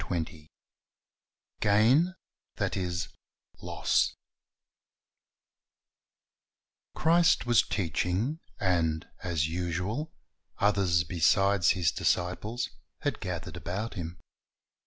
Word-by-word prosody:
7:2 80 -1 -4 1.1
Gain 125 - +4 0.4
That - - -1
Is 90 -2 -2 0.5
Loss - - +1 2.8
/'~^HRIST 165 -2 +4
was 120 -2 +5
teaching, 95 - -1 0.2
and, 80 -4 +1
as 80 -4 0
usual, 90 - -2 0.5
others 95 -5 +3
besides 90 +3 +3
His 85 -4 +2
disciples 105 +7 -1 0.3
had - - -1
gathered - - -5
about 100 +6 -4
Him. 85 -3 -6
90 Hz, 75 wpm, -29 LUFS, 85-110 Hz, 2.8 s, was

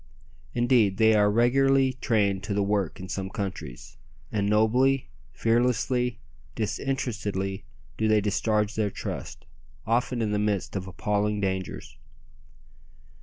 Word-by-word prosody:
Indeed, 120 -5 +3
they 110 +1 +5
are 105 -1 +4
regularly 130 +4 +3
trained 100 -4 +1
to 100 - -2
the 100 - +2
work 100 -4 -1
in 95 - -7
some 95 0 -4
countries; 95 - -6 0.3
and 100 -1 0
nobly, 125 +5 +3 0.2
fearlessly, 120 - +1 0.4
disinterestedly 105 - -2 0.3
do 110 - +1
they 110 0 +4
discharge 105 +1 0
their 110 -2 0
trust, 95 - -6 0.4
often 120 +2 0
in 105 - -1
the 105 - 0
midst 105 -2 -1
of 95 -1 -3
appalling 105 +2 -1
dangers. 95 -6 -4
105 Hz, 125 wpm, -26 LUFS, 100-120 Hz, 0.4 s, they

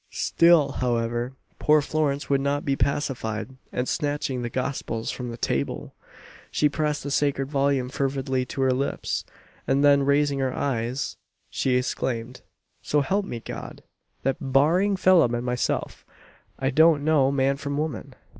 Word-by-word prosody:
Still, 165 -4 +4
however, 120 0 -1 0.3
poor 150 0 +5
Florence 150 -1 -1
would 140 -1 +2
not 140 +1 -1
be 140 - +1
pacified; 130 -4 -2 0.2
and 125 +1 -2
snatching 145 -4 -1
the 120 - -3
Gospels 125 -3 -3
from 125 -2 -5
the 115 - -6
table, 70 - -2 0.6
she 150 - +2
pressed 150 0 -1
the 145 - -4
sacred 140 -1 0
volume 140 -2 +1
fervidly 135 -1 -1
to 135 - -4
her 130 -1 +3
lips, 135 +2 -2 0.4
and 135 +1 +2
then 140 -1 +6
raising 140 0 +2
her 130 -1 -1
eyes, 125 0 -2 0.3
she 130 -1 +1
exclaimed 125 -1 -2 0.4
"So 150 - +1
help 195 +8 0
me 115 - -5
God! - - -8 0.4
that, 135 0 0
barring 155 +9 +3
Phelim 175 -10 +4
and 120 +1 -3
myself, 125 0 -2 0.5
I 135 +1 0
don't 155 +1 +5
know 145 -4 +4
man 135 0 +1
from 140 0 -4
woman." 155 0 -4
135 Hz, 150 wpm, -25 LUFS, 125-145 Hz, 0.6 s, then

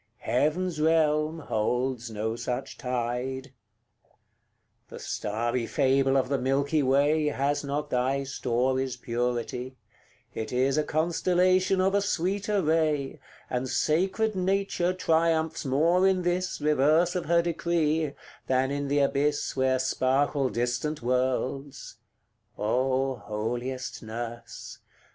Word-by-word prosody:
heaven's 155 +5 0
realm 155 0 +2
holds 125 -2 -1
no 110 +1 -3
such 120 +1 -4
tide. 125 +1 -3
CLI. 135 - -17 1.4
The - - -10
starry 115 +3 -2
fable 135 -1 +2
of 130 - +1
the 140 0 0
milky 140 +4 +1
way 145 +3 +3
Has 145 0 0
not 145 +1 -3
thy 130 +2 +1
story's 130 0 -1
purity; 125 +1 -3 0.6
it 110 -1 -5
is 130 +3 +2
A - - +2
constellation 180 +4 +2
of 190 +1 +2
a 200 - +3
sweeter 200 +1 0
ray, 155 -3 0 0.3
And 125 +1 -2
sacred 190 - +1
Nature 190 -1 0
triumphs 165 -3 +1
more 165 +8 +3
in 185 -1 +2
this 180 +1 -1
Reverse 150 +4 +3
of 180 - -2
her 170 +1 +3
decree, 160 -3 0 0.3
than 130 +1 +1
in 145 0 -2
the 145 +1 +1
abyss 145 +1 0
Where 130 -1 +2
sparkle 135 +1 +1
distant 125 +5 -2
worlds: 130 +2 -2 0.6
Oh, 130 +4 0
holiest 120 +5 -4
nurse! 115 +1 -7
140 Hz, 115 wpm, -27 LUFS, 125-160 Hz, 1.4 s, way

